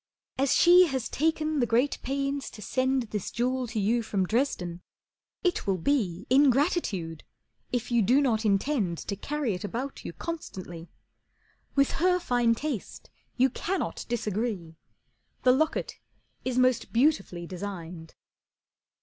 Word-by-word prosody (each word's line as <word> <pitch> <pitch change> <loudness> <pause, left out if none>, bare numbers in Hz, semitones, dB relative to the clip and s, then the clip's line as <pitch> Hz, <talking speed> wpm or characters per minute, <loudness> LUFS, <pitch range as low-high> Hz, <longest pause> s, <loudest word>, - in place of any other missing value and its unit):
As 275 0 +3
she 355 +1 +7
has 260 -5 -2
taken 310 0 0
the 240 - +2
great 245 +6 +2
pains 275 +1 -2
to 215 - -12
send 260 +2 +1
This 210 -3 -3
jewel 255 +1 -1
to 225 -1 -3
you 225 +4 +2
from 200 -4 -1
Dresden, 180 -7 -1 0.6
it 360 - 0
will 195 -1 +2
be 195 - 0
Ingratitude 260 - +2 0.5
if 245 -1 -2
you 235 -1 +4
do 245 +7 +4
not 235 -6 +1
intend 200 - +1
To 200 - -4
carry 280 +2 -2
it 180 - -5
about 250 +6 -4
you - - -5
constantly. 185 - -7 0.9
With 275 -1 +3
her 365 0 +4
fine 245 -8 +2
taste 275 -4 -5 0.3
you 260 +1 +4
cannot 350 - -3
disagree, 210 -7 -2 0.7
The 255 - +6
locket 310 +5 0 0.4
is 255 -1 -2
most 255 -1 +2
beautifully 225 - +1
designed." 175 -3 -7
245 Hz, 135 wpm, -28 LUFS, 195-280 Hz, 0.9 s, she